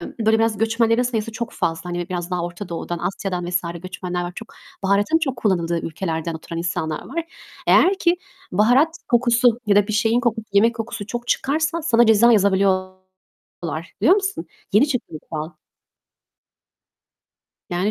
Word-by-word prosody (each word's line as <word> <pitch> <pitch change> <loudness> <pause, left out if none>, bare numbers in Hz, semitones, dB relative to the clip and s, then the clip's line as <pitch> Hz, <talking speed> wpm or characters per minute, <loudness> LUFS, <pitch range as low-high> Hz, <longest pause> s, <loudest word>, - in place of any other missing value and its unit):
Böyle, 220 +4 0
biraz 225 -2 +1
göçmenlerin 230 +1 +2
sayısı 230 -2 -2
çok 235 +1 -5
fazla. 165 +2 -2
Hani, 175 +1 -3
biraz 175 -1 -4
daha 180 -1 -1
Orta 175 +2 -7
Doğu'dan, 170 0 -4
Asya'dan 180 -1 -3
vs. 180 0 +1 0.2
göçmenler 180 -1 -4
var 175 - -5
çok. 225 - -10 0.3
Baharatın 200 +10 +2
çok 270 -6 -2
kullanıldığı 170 -6 0
ülkelerden 165 -1 -3
oturan 165 +1 -6
insanlar 160 -2 -3
var. 335 -1 -3 0.4
Eğer 385 +1 +5
ki 345 +1 +2 0.4
baharat 250 - +3
kokusu 240 -1 +3
ya 200 -1 +3
da 205 - +4
bir - - -2
şeyin 225 +3 +2
kokusu, 225 -2 -1
yemek 225 +4 +4
kokusu 225 -2 -5
çok 240 +2 -5
çıkarsa 315 +4 0
sana 240 -6 +4
ceza 225 +2 +6
yazabiliyorlar, 185 -4 -1
biliyor 360 - +6
musun? 395 -1 -2 0.3
Yeni 225 +9 +5
çıktı 250 -4 -1
bu - - -5
kural. 155 +1 -4 2.2
Yani 180 +4 0
205 Hz, 155 wpm, -21 LUFS, 180-235 Hz, 2.2 s, ceza